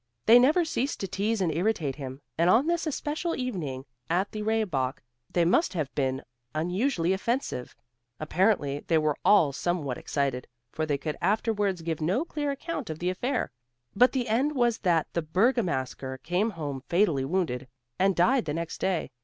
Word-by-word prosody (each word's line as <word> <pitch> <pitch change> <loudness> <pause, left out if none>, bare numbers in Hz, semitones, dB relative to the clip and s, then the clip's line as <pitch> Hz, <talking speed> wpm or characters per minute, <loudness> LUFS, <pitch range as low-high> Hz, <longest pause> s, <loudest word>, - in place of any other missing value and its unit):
They 235 +2 +8
never 305 +8 +4
ceased 280 -3 -2
to 195 - -2
tease 205 +3 -1
and 175 -3 +1
irritate 165 -6 0
him, 135 -1 -7
and 170 +2 +3
on 235 +9 +5
this 340 0 0
especial 310 +3 -2
evening 160 - -4 0.2
at 185 +4 +1
the 215 - -5
Rehbock 190 -12 -1 0.3
they 175 -1 +2
must 190 - +3
have 155 -6 -3
been 130 -1 -1 0.3
unusually 180 - +1
offensive. 220 - -2 0.4
Apparently 155 -3 +1
they 165 - +3
were 155 -2 +1
all 165 -9 +5
somewhat 150 -5 -2
excited, 135 -3 -2 0.2
for 155 0 -2
they 145 -2 +1
could 150 +2 -4
afterwards 205 -2 0
give 160 -1 -3
no 195 - +1
clear 295 -3 -3
account 280 - -4
of 155 - -4
the 180 +2 -1
affair, 245 +9 -2 0.4
but 250 +5 +6
the 250 -2 -1
end 265 +7 +1
was 240 -3 +2
that 170 -5 +2
the 170 - 0
Bergamasker 155 - 0
came 180 +7 +1
home 145 -9 -5
fatally 170 -7 +2
wounded, 135 -5 -1 0.3
and 190 0 +3
died 240 +9 +3
the 150 - -2
next 165 0 -4
day. 180 -7 -1
180 Hz, 170 wpm, -27 LUFS, 150-230 Hz, 0.4 s, They